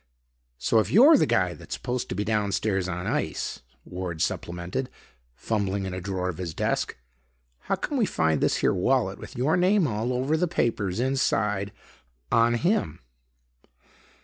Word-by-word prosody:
"So, 110 - +2
if 110 - 0
you're 280 +10 +8
the - - +3
guy 90 -1 +2
that's - - -7
supposed 125 0 -3
to - - -3
be 105 - -1
downstairs 105 -3 0
on 90 0 -4
ice," - - -2 0.2
Ward 90 -2 -5
supplemented, 90 +11 -2 0.5
fumbling 100 - -1
in 95 - -4
a 95 - -4
drawer 95 -1 -2
of 90 -1 -4
his 85 -3 -4
desk, - - -1 0.6
"how - - -1
come 275 +8 -3
we 220 - +3
find 80 -2 +1
this - - +2
here - - +4
wallet 95 0 +1
with - - -10
your 130 +6 +2
name 185 +1 +3
all 115 -1 -1
over 130 +5 0
the 175 +3 +1
papers 105 - -1
inside 105 -6 0 0.6
on 115 +1 +4
him?" 170 - 0
105 Hz, 160 wpm, -26 LUFS, 90-130 Hz, 0.6 s, you're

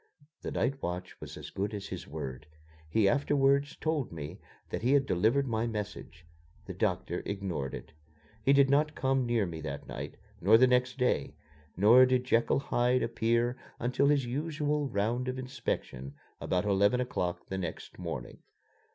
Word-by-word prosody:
The - - -4
night 135 +1 -1
watch 90 +1 -5
was - - -8
as - - -8
good 100 +2 -2
as 100 -1 -6
his - - -6
word. 65 +2 -6 0.4
He 100 +5 +3
afterwards 140 +3 +2
told 155 -5 -1
me 80 +4 -7 0.3
that - - -2
he 125 +4 +3
had 140 -1 +4
delivered 115 +8 +2
my 115 0 0
message. 100 -6 -6 0.4
The - - -6
doctor - - -1
ignored 95 -9 -3
it. 80 - -10 0.5
He 135 - +4
did 140 -1 +6
not 150 +3 +2
come 135 -1 +1
near 115 -3 +2
me 80 -3 -6
that 70 -2 -6
night, - - -6 0.2
nor 105 +6 +7
the 130 - +6
next 125 +1 +2
day, 125 -1 0 0.4
nor 120 +7 +7
did 130 -1 +2
Jekyll 120 -2 +2
Hyde 125 -2 +1
appear 115 +2 +1 0.2
until 125 +4 +2
his 145 -3 +3
usual 150 +2 -1
round 120 +3 -1
of 130 0 -2
inspection 115 - -4 0.2
about 90 +1 0
eleven 100 +4 +3
o'clock 90 -8 -2
the 95 - -2
next 85 0 -6
morning. 80 -9 -6
120 Hz, 165 wpm, -30 LUFS, 95-135 Hz, 0.5 s, nor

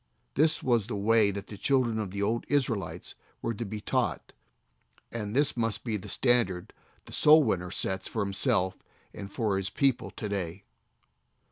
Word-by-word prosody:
This 155 +3 +2
was 120 -5 +2
the 120 - -3
way 105 +1 +4
that 100 0 -4
the 105 - -10
children 125 -5 +2
of 105 -3 -3
the 100 +2 -3
old 115 +3 0
Israelites 130 -8 -1 0.3
were 115 - -2
to 115 - -4
be 105 0 -5
taught, - - -2 0.8
and 105 -1 -4
this 145 +1 +3
must 115 -3 -1
be 115 -3 -2
the 100 - -6
standard 115 -8 +1 0.3
the - - -12
soul 155 +1 +6
winner 90 -7 -1
sets 95 +1 -1
for - - -2
himself 95 -1 +1 0.4
and 100 0 -8
for 105 -3 0
his 95 -1 -2
people 135 +4 +1
to 105 - -6
day. 95 -2 -4
105 Hz, 170 wpm, -29 LUFS, 100-120 Hz, 0.8 s, soul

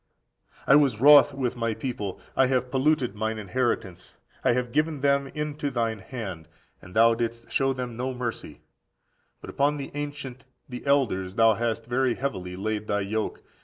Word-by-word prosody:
35. - - -27
"I 135 - +7
was 135 -7 +2
wroth 145 +2 +8
with 130 -3 -2
my 115 -2 -1
people; 110 -5 -4 0.2
I 135 - +4
have 125 -1 0
polluted 135 -3 +1
mine 110 +1 -2
inheritance, 105 -3 -3 0.3
I - - +4
have 125 0 -2
given 150 +1 0
them 140 0 +2
into 150 -1 -3
thine 115 -4 -1
hand: 95 -7 -7 0.3
and 90 - -14
thou 115 +1 +6
didst 115 0 -4
show 135 0 +2
them 125 -3 -5
no 130 +2 -2
mercy; 120 - -5 0.8
but - - -8
upon 145 +1 +1
the 140 - -6
ancient 145 -3 -6 0.2
(the 125 -2 -7
elders) 100 -10 +1
thou 115 -1 +5
hast 115 +1 -2
very 125 0 +1
heavily 95 -10 -4
laid 105 +2 -3
thy 105 0 0
yoke. 105 +2 -3
120 Hz, 170 wpm, -26 LUFS, 110-135 Hz, 0.8 s, wroth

